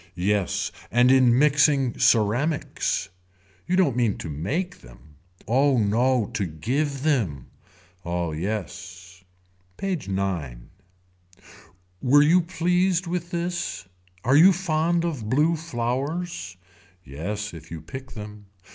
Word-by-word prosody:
Yes. 95 +1 0 0.2
And 120 +2 +4
in 130 -2 +5
mixing 145 -2 +3
ceramics. 125 +5 +1 0.6
You 180 - +1
don't 180 -10 +3
mean 120 -4 +1
to 80 - -6
make 140 - -3
them. 70 +5 -17 0.3
Oh 135 +4 +3
no 115 +2 +2
to 100 - -1
give 135 - -2
them. 105 - -1 0.5
Oh 85 -1 -2
yes. 90 +1 -6 0.5
PAGE 190 - -3
IX. 90 -11 -2 1.4
Were 145 +3 +5
you 170 +4 +5
pleased 180 +1 +1
with 175 0 -3
this. 170 - -3 0.4
Are 130 +3 +3
you 175 +6 +8
fond 170 -1 0
of 135 -11 -4
blue 150 +7 +3
flowers. 135 - -3 0.5
Yes 100 +9 -5
if 80 -2 -11
you 80 - -6
pick 130 - -9
them. 105 -1 -9
125 Hz, 115 wpm, -24 LUFS, 95-155 Hz, 1.4 s, you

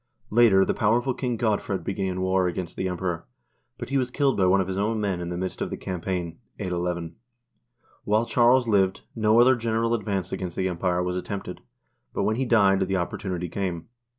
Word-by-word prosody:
Later 105 -4 +5
the - - 0
powerful 120 +5 +1
King 125 -2 -2
Godfred 105 -4 -1
began 95 0 -2
war 95 0 +2
against 90 0 -4
the 95 - -2
Emperor, 90 -2 -3 0.5
but - - -7
he 135 0 +2
was 125 -1 -1
killed 135 0 +1
by 95 -2 +3
one 95 +2 +4
of 95 - 0
his 95 0 -3
own 110 +2 0
men 100 -4 -1
in 85 - -4
the 90 - -4
midst 95 +1 -4
of - - -1
the - - -5
campaign 90 -2 -4 0.2
(81 90 -3 -2
1).1 85 -1 -7 0.9
While 110 +2 +2
Charles 120 +1 +4
lived, 95 -3 +2
no 110 0 +4
other 130 +2 +6
general 115 0 0
ad 115 -3 -1
vance 95 -3 -2
against 90 -2 -4
the 95 - +1
Empire 90 0 0
was 90 0 -2
attempted, 100 +2 -5 0.5
but - - 0
when 110 +1 +1
he 135 - 0
died, 100 -5 +4
the 95 0 0
opportunity 90 0 -3
came. 90 -1 -4
95 Hz, 205 wpm, -25 LUFS, 90-115 Hz, 0.9 s, other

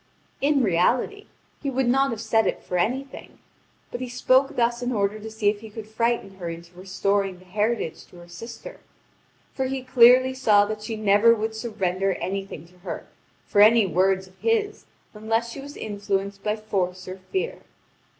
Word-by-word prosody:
In 280 -1 +3
reality, 240 - +1 0.3
he 280 - -2
would 265 -1 0
not 270 +3 +3
have 230 -3 -4
said 225 0 +2
it - - -2
for 180 - -5
anything; 260 +9 -3 0.5
but 245 - -5
he 255 - -4
spoke 260 +3 +2
thus 240 0 +1
in 245 +1 -1
order 205 -2 0
to 220 +1 -7
see 220 -1 -2
if 205 0 +2
he 220 +1 -10
could 215 0 -9
frighten 220 -3 -1
her 175 -3 -5
into 170 +1 -9
restoring 195 +1 -1
the 185 - -18
heritage 210 -1 -2
to - - -19
her 175 0 -13
sister; 230 - -10 0.7
for 265 - -1
he 260 0 -3
clearly 255 +1 +6
saw 215 -6 +4
that 215 0 -5
she 220 +1 -4
never 215 +2 +5
would 220 0 -3
surrender 195 -4 -1
anything 195 -5 -5
to 180 0 -23
her 175 - -6 0.4
for 205 - +3
any 220 +1 +7
words 190 +2 +1
of 185 0 -20
his 430 -2 0 0.3
unless 225 +2 -1
she 275 - -8
was 285 +1 -10
influenced 200 -1 -3
by 210 +1 0
force 185 -4 -3
or 185 +1 -7
fear. 480 +6 -2
215 Hz, 180 wpm, -24 LUFS, 195-245 Hz, 0.7 s, any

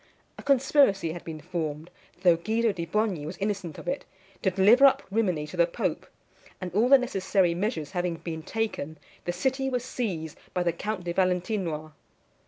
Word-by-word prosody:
A - - -10
conspiracy 265 - +3
had 175 - -8
been 160 -2 -6
formed, 160 -1 -4 0.3
though 175 -2 +7
Guido 220 +6 +1
di 170 -4 -5
Bogni 205 -4 0
was 170 - -6
innocent 195 -6 -3
of - - -10
it, 275 - -1 0.4
to - - +3
deliver 205 +9 +7
up 270 - +2
Rimini 185 -8 +1
to 155 +4 -9
the 170 0 +5
pope; 170 - -2 0.5
and 180 -2 -5
all 225 +6 +3
the 275 - +9
necessary 195 -7 +1
measures 180 - -2
having 175 -2 -1
been 165 -1 -6
taken, 160 -6 -3 0.3
the 175 - 0
city 265 +9 0
was 250 -1 -2
seized 185 - -4 0.2
by 180 - +2
the 170 -1 +1
Count 205 +2 -4
de 175 0 -3
Valentinois. 180 -4 0
185 Hz, 180 wpm, -27 LUFS, 170-225 Hz, 0.5 s, the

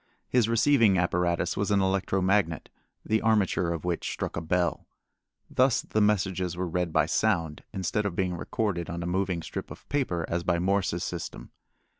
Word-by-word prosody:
His 120 -3 +2
receiving 115 -4 +4
apparatus 85 0 +1
was 100 +1 -1
an 100 -1 +3
electro 95 0 +1
magnet, 95 -4 +1 0.4
the 110 0 +1
armature 105 -6 +2
of 85 -2 -4
which 85 -2 -1
struck - - -4
a 85 - -2
bell. 85 +2 0 0.6
Thus 130 -1 +2
the 110 - 0
messages 95 -4 +1
were 90 0 -1
read 90 0 -1
by - - +3
sound, 80 -3 0
instead 100 +2 -1
of 90 - -5
being 90 -1 0
recorded 85 +1 -2
on 85 0 -4
a - - -4
moving 90 -1 -1
strip - - -6
of - - -12
paper 90 - 0
as 85 +1 -1
by 85 -1 +1
Morse's 90 -1 0
system. 85 -2 -6
90 Hz, 175 wpm, -27 LUFS, 85-105 Hz, 0.6 s, receiving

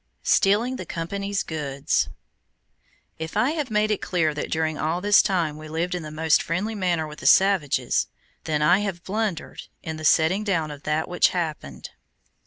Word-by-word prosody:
STEALING 230 +6 +2
THE - - -6
COMPANY'S 200 +4 -3
GOODS 145 -2 -1 1.1
If 160 0 -5
I 260 - +3
have 300 -5 -3
made 215 0 +1
it 210 - -1
appear 165 -5 +1
that 150 - -4
during 160 -1 0
all 160 +3 -1
this 205 +2 +5
time 170 -7 -1
we 155 - -9
lived 165 +3 -2
in 180 - -3
the 155 - -7
most 155 +1 +2
friendly 195 +7 -2
manner 180 -6 0
with 150 0 -10
the - - -2
savages, 190 -7 +3 0.4
then 150 -2 0
have 185 +4 +3
I 175 - -30
blundered 205 -4 -3 0.2
in 160 0 -5
the 155 - -8
setting 160 +6 +3
down 165 -7 -1
of 145 -1 -9
that 155 +1 0
which 180 - +3
happened. 150 - -5
170 Hz, 180 wpm, -24 LUFS, 155-200 Hz, 1.1 s, this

